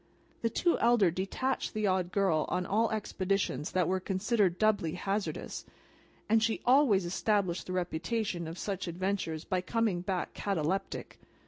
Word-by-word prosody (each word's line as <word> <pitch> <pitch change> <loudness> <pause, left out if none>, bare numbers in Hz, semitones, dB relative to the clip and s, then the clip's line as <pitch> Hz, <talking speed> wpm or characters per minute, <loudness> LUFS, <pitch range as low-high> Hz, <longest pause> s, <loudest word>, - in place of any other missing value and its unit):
The 230 - +1
two 345 +9 +1
elder 230 -7 +4
detached 195 +9 -2
the 215 -1 0
Odd 185 -2 +1
Girl 190 -7 +2
on 180 0 -1
all 220 +5 +2
expeditions 195 - -1
that 185 - +2
were 185 +1 +1
considered 190 0 +1
doubly 205 -7 +2
hazardous, 195 +3 -3 0.6
and 225 +1 +4
she 225 0 +1
always 245 -8 +5
established 185 0 0
the 185 - -4
reputation 180 +1 -2
of 165 +2 -6
such 195 -2 -3
adventures 175 -2 -2
by 185 -1 0
coming 215 -3 0
back 185 -1 -2
cataleptic. 195 0 -2
195 Hz, 145 wpm, -31 LUFS, 180-215 Hz, 0.6 s, always